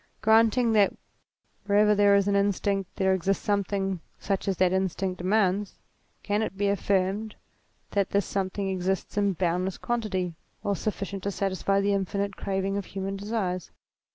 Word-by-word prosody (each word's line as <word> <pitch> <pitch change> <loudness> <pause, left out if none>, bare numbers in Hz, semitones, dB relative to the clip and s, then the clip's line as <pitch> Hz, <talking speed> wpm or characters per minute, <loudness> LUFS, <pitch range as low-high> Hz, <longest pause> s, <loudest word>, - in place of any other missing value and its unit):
Granting 225 +2 +4
that 205 -2 +4 0.7
wherever 210 +1 +5
there 205 -1 +5
is 200 0 +3
an 200 - +2
instinct 200 -1 0
there 190 -1 +2
exists 190 +3 0
something 195 -2 0 0.2
such 195 -1 -2
as 195 -2 0
that 185 -1 +3
instinct 190 0 -1
demands, 195 +1 +1 0.5
can 205 +1 0
it 205 -3 -3
be 200 0 +1
affirmed 200 +2 0 0.6
that 200 -2 +1
this 200 -1 +1
something 195 0 -2
exists 190 0 -2
in 200 -1 +2
boundless 180 +1 -1
quantity, 200 -7 -2 0.3
or 200 - 0
sufficient 200 -1 -3
to 200 - -2
satisfy 195 0 0
the 200 0 +2
infinite 200 0 -1
craving 195 0 -2
of 200 - -3
human 195 0 -4
desires? 195 -4 -3
195 Hz, 155 wpm, -27 LUFS, 190-205 Hz, 0.7 s, wherever